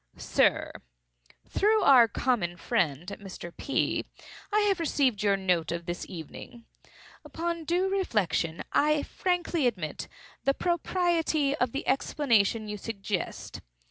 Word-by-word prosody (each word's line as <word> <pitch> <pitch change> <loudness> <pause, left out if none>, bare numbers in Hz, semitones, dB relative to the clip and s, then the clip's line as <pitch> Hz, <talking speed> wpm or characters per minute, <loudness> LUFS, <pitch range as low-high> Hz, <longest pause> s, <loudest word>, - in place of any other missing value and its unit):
"SIR,—Through - - -1
our 255 -4 +7
common 205 -6 -1
friend, 175 - -1
Mr. 185 -4 -9
P., 275 - 0 0.5
I 425 +1 +3
have 400 -3 +2
received 275 -9 +1
your 200 -1 +3
note 180 -4 0
of 170 0 -4
this 175 0 -5
evening. 190 +7 -9 0.6
Upon 335 0 -4
due 355 +4 +1
reflection 210 - 0
I 300 0 +3
frankly 350 -5 0
admit 180 -10 -3 0.4
the 275 - +2
propriety 340 -4 +1
of 250 -5 0
the 275 - -4
explanation 230 -6 +2
you 210 0 -4
suggest. 200 -3 -4
235 Hz, 115 wpm, -28 LUFS, -, 0.6 s, our